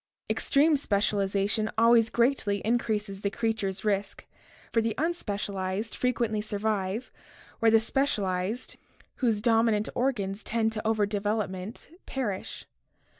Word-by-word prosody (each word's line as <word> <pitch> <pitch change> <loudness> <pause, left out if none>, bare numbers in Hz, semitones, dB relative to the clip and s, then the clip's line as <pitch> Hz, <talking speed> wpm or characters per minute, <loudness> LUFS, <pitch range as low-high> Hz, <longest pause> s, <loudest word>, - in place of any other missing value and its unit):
Extreme 295 +2 +4
specialization 205 -2 +1
always 230 0 +5
greatly 235 -4 +2
increases 215 -4 -1
the 200 - 0
creature's 200 -3 -2
risk, 200 -1 -1 0.5
for 230 - +4
the 225 0 -1
unspecialized 205 - -2
frequently 235 -4 0
survive 210 +1 -2 0.5
where 230 - +5
the 225 0 +6
specialized, 215 -4 -1 0.4
whose 225 -5 +1
dominant 225 -2 +3
organs 215 -6 -1
tend 225 0 0
to 220 0 -4
over 220 -2 +2
development, 205 -1 -3 0.2
perish. 215 -8 -4
215 Hz, 110 wpm, -28 LUFS, 200-230 Hz, 0.5 s, the